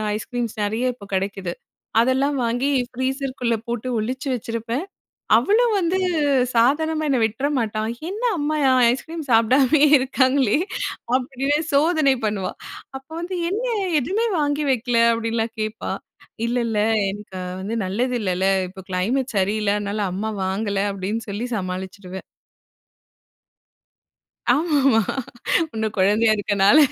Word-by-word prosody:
Ice creams 235 +1 -4
நிறைய 230 +5 0
இப்போ 215 -4 -13
கிடைக்குது. 190 -2 -2 0.5
அதெல்லாம் 265 +4 +2
வாங்கி 240 +3 0 0.2
ஃப்ரீஸ்குள்ள 260 -2 -1
போட்டு 240 +1 -3
ஒளிச்சு 255 +6 -3
வச்சிருப்பேன். 230 +5 -3 0.5
அவளும் 450 +2 +3
வந்து 365 0 +1 0.6
சாதாரணமா 310 +7 +2
என்ன 270 - +2
விட்ற 235 +6 -1
மாட்டா. 215 -2 -1 0.3
என்ன 430 +5 -6 0.2
அம்மா 300 +1 0
அ - - +5 0.2
ஐஸ்கிரீம் 320 +4 -5
சாப்பிடாமயே 260 +6 +5
இருக்காங்களே 260 -1 +2 0.6
அப்படினே 270 +3 -1 0.2
சோதனை 305 -2 +4
பண்ணுவா. 205 -3 -1 0.5
அப்போ 270 +4 -19
வந்து 360 +2 -4
என்ன 440 +6 -1 0.3
எதுவுமே 395 - 0
வாங்கி 295 0 0
வைக்கல 245 -2 +1
அப்படின்லாம் 230 0 -2
கேட்பா. 215 +1 -3 0.5
இல்ல 240 - -1
இல்ல 220 -2 -1 0.3
எனக்கு 195 -2 -8 0.2
வந்து 220 +4 -3
நல்லது 245 +6 -1
இல்லல 185 0 0 0.2
இப்போ 190 +1 -11
கிளைமேட் 230 +7 -1
சரியில்ல 205 +1 +1
அதனால 205 +1 -2
அம்மா 215 +3 -2
வாங்கல 200 +1 -1
அப்படின்னு 200 +4 -3
சொல்லி 215 +5 -3
சமாளிச்சுடுவேன். 185 0 -5 2.3
ஆமாமா. 280 -6 +3 0.7
இன்னும் 220 -1 -2
குழந்தையா 210 +4 +4
இருக்கனால 205 +6 +4
235 Hz, 115 wpm, -22 LUFS, 210-275 Hz, 2.3 s, அ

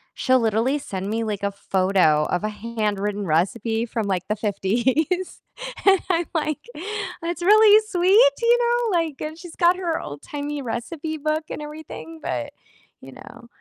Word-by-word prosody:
she'll 260 0 +3
literally 230 +6 +1
send 195 -6 -5
me, 225 +2 -1
like, 210 -2 -3
a 200 - 0
photo 185 -6 +2
of 180 - 0
a 215 - 0
handwritten 210 -2 -2
recipe 220 +8 0
from, 225 -2 -3
like, 185 -2 -1
the 215 - +1
'50s, 240 - 0 0.4
and 390 -2 +6
I'm 345 -2 +1
like, 305 -2 -1 0.6
"That's 340 +1 -4
really 425 +2 +7
sweet, 410 +6 +5
you 470 +1 +5
know, 475 -5 +1
like" 315 -4 -4
and 310 +1 -5
she's 345 -1 -11
got 350 +1 +4
her 340 -3 -1
old-timey 285 - -6
recipe 310 +7 -4
book 310 +1 -1
and - - -5
everything, 295 - -9
but, 120 -2 -3 0.5
you 135 - -11
know, 235 - -13
260 Hz, 160 wpm, -23 LUFS, 205-340 Hz, 0.6 s, really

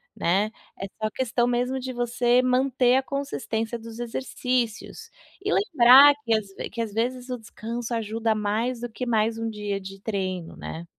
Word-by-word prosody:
né. 195 +5 +1 0.3
É 195 - -3 0.2
só 215 - 0
questão 240 -1 0
mesmo 250 +2 0
de 260 0 -5
você 245 0 +2
manter 255 0 +3
a 265 - +2
consistência 255 -5 -3
dos 230 0 -10
exercícios 240 -1 -3 0.3
e 410 - -1
lembrar 285 - +7
que 230 - +1
às 215 -2 0
ve - - -5
que 230 - -4
às 220 -3 -4
vezes 245 +3 -2
o 250 - -2
descanso 230 +1 -6
ajuda 225 0 0
mais 215 +4 -1
do 240 - -4
que 240 +3 -5
mais 225 -1 +1
um 225 0 -2
dia 210 -2 -3
de 195 +1 -9
treino, 185 -5 -3
né. 165 +1 -7
235 Hz, 175 wpm, -25 LUFS, 220-250 Hz, 0.3 s, lembrar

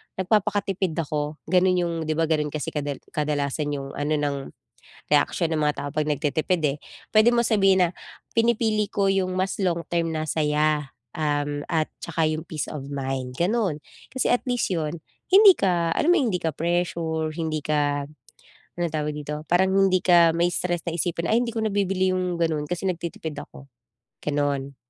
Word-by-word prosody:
nagpapakatipid 195 -2 0
ako, 150 0 -3
gano'n 185 0 +4
'yong 170 -1 -1
diba 155 +1 +1
gano'n 150 -2 +1
kasi 155 - -3
kadal 145 -2 -4
kadalasan 145 -1 -1
'yong 135 -1 -4
ano 145 +1 0
ng 145 -1 -1 0.8
reaksyon 160 +3 +2
ng 155 - 0
mga 150 0 +2
tao - - -3
'pag 155 -1 0
nagtitipid, 155 +4 0
eh, 145 0 +1 0.4
pwede 215 +2 +6
mo 240 0 +2
sabihin 195 -4 +4
na, - - -3 0.5
"Pinipili 225 -2 +2
ko 200 -1 +1
'yong 190 -1 0
mas 190 +1 0
long-term 170 -1 0
na 155 -1 -2
saya, 150 -1 +1 0.2
um, 145 -1 -1
at 160 -2 +1 0.2
saka 160 -1 0
'yong 155 0 -1
peace 155 -2 -4
of 140 -2 -7
mind," 135 -2 -4
gano'n. 190 -3 +1 0.3
Kasi 260 - -1
at 245 - +2
least 245 -1 +1
'yon 160 0 -2 0.3
hindi 390 0 +9
ka 170 - +1
alam 335 - +2
mo 360 - +5
'yong 235 -9 0
hindi 180 - -2
ka 160 - +1
pressure, 165 -1 -1
hindi 155 -2 -3
ka 145 -1 0 0.8
anong 170 - +1
tawag 150 -1 -1
dito, 150 +1 -5
parang 180 +3 +3
hindi 195 -1 +3
ka 170 -2 +5
mai-stress 175 +1 0
na 170 - -2
isipin, 170 0 -1
"Ay, 235 +2 +3
hindi 235 - -4
ko 225 - -2
nabibili 195 -3 +1
'yong 180 -2 -1
gano'n 160 -3 0
kasi 175 +4 -3
nagtitipid 165 -3 -4
ako," 145 -1 -10 0.6
gano'n. 145 -2 -1
165 Hz, 170 wpm, -24 LUFS, 150-185 Hz, 0.8 s, hindi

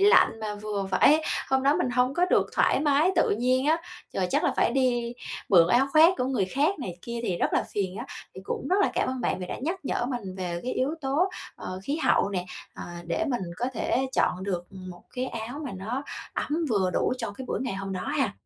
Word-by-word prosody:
lạnh, 395 - +5
mà 210 -1 -3
vừa 205 -2 -3
phải 300 +11 +5 0.3
hôm 265 0 +3
đó 280 +2 +4
mình 250 - 0
hông 250 +2 +2
có 350 +1 +3
được - - +4
thoải - - +3
mái 300 +4 +4
tự - - +4
nhiên 255 +5 +2
á. 320 +2 +4 0.4
Rồi 185 -1 +1
chắc - - +2
là - - +3
phải - - +3
đi 245 -2 +1 0.3
mượn 170 -4 +7
áo 250 +5 +4
khoác 320 +3 +8
của 250 - +1
người 255 -7 +1
khác 290 - +1
này 180 -10 -5
kia 235 0 -5
thì 185 -6 -1
rất - - +1
là - - +2
phiền 190 -2 -2
á. - - -5 0.3
Thì 190 - -8
cũng 275 - -3
rất 375 - +3
là - - +3
cảm - - +1
ơn 260 0 -2
bạn 230 - 0
vì 180 - -5
đã - - -4
nhắc 345 +5 -2
nhở 240 - -1
mình 235 -8 -4
về 175 -2 -3
cái 255 - -2
yếu 270 +5 0
tố, 295 +8 +1 0.3
ờ, 185 0 -6
khí 280 +9 -1
hậu 320 - +3
nè, 180 -2 -2 0.3
ờ, - - -7 0.2
để 325 - 0
mình 245 -7 -1
có 245 - -1
thể 260 +3 0
chọn 185 - +1
được 180 -3 -2
một 185 -2 -9
cái 255 +1 -1
áo 235 +3 -5
mà 265 - -4
nó 230 +9 -3 0.3
ấm 320 +3 -1
vừa 190 -5 +2
đủ - - +1
cho 230 -4 -3
cái 260 +6 -8
buổi - - -2
ngày 255 -7 -2
hôm 195 0 -4
đó 185 - -3
ha. 275 -5 0
245 Hz, 245 wpm, -27 LUFS, 195-275 Hz, 0.4 s, khoác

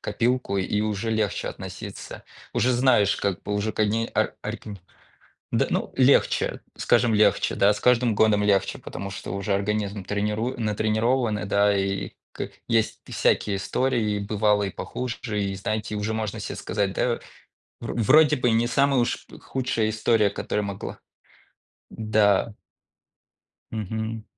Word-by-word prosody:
копилку, 115 0 0
и 100 +2 0
уже 110 +1 -1
легче 110 -2 -1
относиться. - - -8 0.3
Уже 125 +1 +2
знаешь, 120 -5 +3
как 100 -3 -2
бы 105 - -2
уже 105 +2 0
к - - -15
они 110 +2 +1
ар - - +1
арикин 105 -2 -6 0.7
д - - +2
ну - - -1
легче, 130 +1 +3 0.2
скажем, 120 -1 +3
легче, 105 -1 +3
да, 100 +1 +4
с - - -6
каждым 125 -2 +3
годом 105 -1 +3
легче, 100 -2 +2
потому 100 0 -7
что 100 - -6
уже 100 0 -1
организм 100 0 -2
тренируи 105 +5 -1
натренирован 110 +2 +1
и - - -4
да, 100 0 +3
и 95 0 -1 0.2
к - - -5 0.2
есть 115 -1 +1
пи - - -12
всякие 100 -2 +1
истории, 110 +1 0
и - - -1
бывало 105 0 +1
и 95 - -2
похуже. 120 -4 -4
И 100 -1 -2
знаете, 105 +2 -3
уже 105 +1 -2
можно 110 -2 -3
се - - -5
сказать, 100 -2 -1
да 120 +3 0 0.6
вро - - -5
вроде 150 +7 +5
бы 125 -1 +2
не 115 +1 +2
самая 135 +1 +3
уж 120 - -2
п - - -13
худшая 125 -4 -1
история, 110 -1 +2
которая 105 +1 -2
могла 100 -1 -6 0.9
да. 110 -1 +2 1.2
Мгм. 110 +1 -4
110 Hz, 155 wpm, -25 LUFS, 100-115 Hz, 1.2 s, вроде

